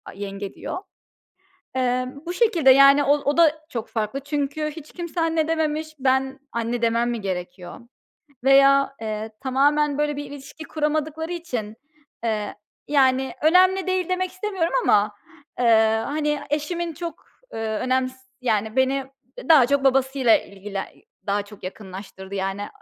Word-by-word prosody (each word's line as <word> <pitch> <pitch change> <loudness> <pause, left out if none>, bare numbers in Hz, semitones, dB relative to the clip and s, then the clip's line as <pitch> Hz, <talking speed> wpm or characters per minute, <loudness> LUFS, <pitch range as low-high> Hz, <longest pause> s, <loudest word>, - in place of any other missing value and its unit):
"yenge" 195 0 -6
diyor. - - -6 1.0
Eee, 255 -1 +1 0.2
bu 350 - -3
şekilde, 355 - +4
yani, 275 +2 +7
o 280 - +4
o 285 +2 -1
da 315 -2 +4
çok 230 -3 -4
farklı 220 +4 -2
çünkü 290 +2 -2
hiç 305 -1 -11
kimse 345 -1 -4
"anne" 325 -1 +1
dememiş. 310 -1 -1
Ben 265 +1 +1
anne 235 +1 -2
demem 235 +1 +2
mi 235 -3 -3
gerekiyor 180 -1 -5 0.7
veya, 275 0 +5
eee, 215 0 -4
tamamen, 285 +2 +2
böyle, 295 -1 0
bir 290 - -4
ilişki 285 +2 -10
kuramadıkları 310 +2 -2
için, 245 -11 -5 0.5
eee, 215 -2 -2 0.3
yani, 265 -2 +2
önemli 370 +4 +4
değil 370 -1 0
demek 370 0 -1
istemiyorum 370 -3 -2
ama, 205 0 +3 0.5
eee, 220 -2 +4
hani, 295 0 -1
eşimin 335 +3 -2
çok, 340 +1 -7 0.3
ııı, 225 - -4 0.2
önems 255 +1 0 0.3
yani, 220 -1 -1
beni 265 +1 +2 0.4
daha 300 -7 +7
çok 280 +1 +1
babasıyla 265 -2 +4
ilgili 200 0 -7 0.5
daha 205 +1 0
çok 205 0 -15
yakınlaştırdı 190 0 -8
yani 195 +1 -3
270 Hz, 135 wpm, -23 LUFS, 225-310 Hz, 1.0 s, yani